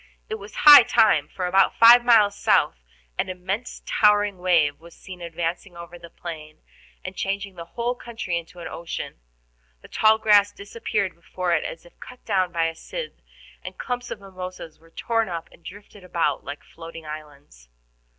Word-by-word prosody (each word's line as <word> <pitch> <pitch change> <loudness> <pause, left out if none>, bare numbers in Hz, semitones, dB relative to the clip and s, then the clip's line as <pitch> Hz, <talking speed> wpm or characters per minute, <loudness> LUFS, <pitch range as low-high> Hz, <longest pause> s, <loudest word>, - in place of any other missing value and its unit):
It 220 - -4
was 200 +1 -12
high 295 -2 +12
time, 220 - +3
for 185 - -5
about 190 +2 +3
five 235 +1 +8
miles 215 -4 +4
south - - +2 0.4
an - - -1
immense 185 +6 -5
towering 205 -2 +2
wave 170 -5 +2
was 170 +1 -16
seen 185 -2 -11
advancing 170 +2 -5
over 170 0 -10
the 170 0 -12
plain, 155 -3 -10 0.4
and - - -6
changing 195 0 -3
the 170 -2 -9
whole 240 +1 0
country 230 -7 -5
into 170 +1 -6
an - - -6
ocean. 165 - -7 0.6
The - - -12
tall 220 0 +3
grass 205 -2 +4
disappeared 200 -1 -3
before 175 +1 -3
it 160 - +1
as 165 - -7
if 175 - -20
cut 250 0 -13
down 185 -4 0
by 165 -1 0
a 165 - -2
scythe, 480 - -8 0.4
and - - -9
clumps 245 -1 -4
of - - -6
mimosas 185 -4 -9
were 165 +1 -22
torn 225 +5 -1
up 170 -2 -5
and 170 - -20
drifted 200 +2 -12
about 175 -2 -1
like 145 +1 -8
floating 165 -1 -11
islands. 145 - -11
185 Hz, 175 wpm, -23 LUFS, 165-210 Hz, 0.6 s, high